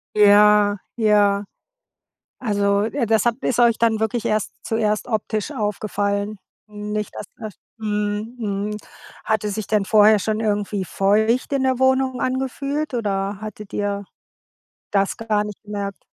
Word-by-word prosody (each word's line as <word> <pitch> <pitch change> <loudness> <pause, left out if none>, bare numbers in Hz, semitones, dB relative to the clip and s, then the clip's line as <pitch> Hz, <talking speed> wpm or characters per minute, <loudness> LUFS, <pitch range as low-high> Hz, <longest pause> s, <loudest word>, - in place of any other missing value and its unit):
Ja, 210 0 +6 0.2
ja. 205 -2 +3 1.0
Also, 200 -3 +1
äh, 235 +2 -1
das 220 0 +2
habt 240 +2 0
ist 245 - 0
euch 235 -2 +5
dann 225 -2 +2
wirklich 220 +1 -1
erst 215 -1 0
zuerst 215 0 0
optisch 215 -2 -2
aufgefallen? 205 -1 -2 0.3
Nicht 210 0 -4
dass - - -6
das 215 -4 -7 0.2
mhm, 210 +2 -2
mhm. 210 -1 -3 0.5
Hat 220 -1 +1
es 205 -1 -2
sich 215 -3 -3
denn 210 -2 +1
vorher 215 0 +6
schon 215 +2 -1
irgendwie 205 -2 -1
feucht 220 - +1
in 270 -1 +1
der 260 -1 +1
Wohnung 260 -1 +2
angefühlt, 270 +3 -2
oder 200 -3 -2
hattet 215 -1 -8
ihr 200 -1 -2 0.9
das 195 -1 +1
gar 215 -2 0
nicht 210 -1 -8
gemerkt? 200 -1 -5
210 Hz, 140 wpm, -22 LUFS, 205-225 Hz, 1.0 s, Ja